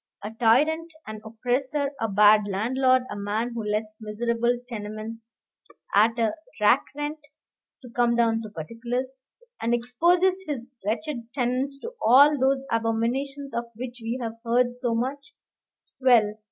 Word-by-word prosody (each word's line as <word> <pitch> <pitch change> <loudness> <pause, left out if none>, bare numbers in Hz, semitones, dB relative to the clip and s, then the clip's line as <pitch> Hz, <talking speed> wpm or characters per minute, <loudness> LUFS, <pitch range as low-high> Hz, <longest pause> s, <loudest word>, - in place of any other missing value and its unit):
A 210 - -5
tyrant, 295 +9 +2
an 215 0 -7
oppressor, 260 +5 -1
a 225 - +1
bad 210 0 +5
landlord, 255 +6 +2
a - - -4
man 210 +4 -2
who 230 -1 -4
lets 215 +1 -3
miserable 235 +3 0
tenements 220 0 -7 0.6
at 220 +3 +4
a 225 -2 +1 0.3
rack 210 +5 +4
rent 295 +1 -4 0.6
(to 250 - -10
come 240 0 +2
down 225 -1 +2
to 215 - -7
particulars), 240 - -5 0.4
and 235 +1 +2
exposes 350 +11 +2
his 265 -3 -5
wretched 235 +2 -3
tenants 260 +2 -1
to 470 - -7
all 280 +6 +7
those 265 +1 +2
abominations 240 +5 -1
of 235 - -2
which 245 +1 -7
we 230 +2 -3
have 230 -2 -4
heard 245 +1 +2
so 245 -2 -2
much 280 +4 -3 0.7
well! 235 -5 +4
240 Hz, 140 wpm, -25 LUFS, 225-265 Hz, 0.7 s, all